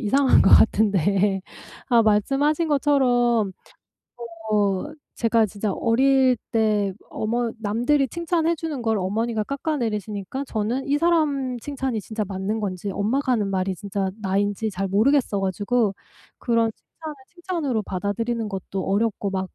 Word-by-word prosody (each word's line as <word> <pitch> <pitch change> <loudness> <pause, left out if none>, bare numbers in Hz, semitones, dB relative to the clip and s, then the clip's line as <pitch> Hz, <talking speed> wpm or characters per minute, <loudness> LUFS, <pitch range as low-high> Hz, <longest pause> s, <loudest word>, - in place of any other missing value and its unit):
이상한 265 +5 +4
것 - - +5
같은데 200 -2 +4 0.5
아 235 -2 +5
말씀하신 275 +10 +2
것처럼 245 -7 +2 1.0
어 200 -3 +1 0.3
제가 230 -1 +2
진짜 205 +1 -3
어릴 260 +2 +3 0.2
때 210 -3 +1 0.2
어머 230 +1 -1
남들이 245 +7 +1
칭찬해 335 +1 0
주는 310 -5 -4
걸 225 -2 +1
어머니가 215 +4 -1
깎아내리시니까 230 - -3
저는 245 +5 -2
이 285 +1 +2
사람 290 -6 +1
칭찬이 265 -5 -3
진짜 215 0 -4
맞는 200 +3 -3
건지 200 -1 -3
엄마가 255 +7 0
하는 205 -4 0
말이 190 0 -1
진짜 195 0 -3
나인지 205 +2 0
잘 195 +1 -2
모르겠어 220 +1 +2
가지고 205 +3 0 0.5
그런 230 -2 +1
칭찬을 315 -2 -10
칭찬으로 335 -10 -2
받아들이는 215 +5 -2
것도 195 -1 -4
어렵고 200 0 0
막 190 -1 -3
225 Hz, 305 characters per minute, -23 LUFS, 200-270 Hz, 1.0 s, 것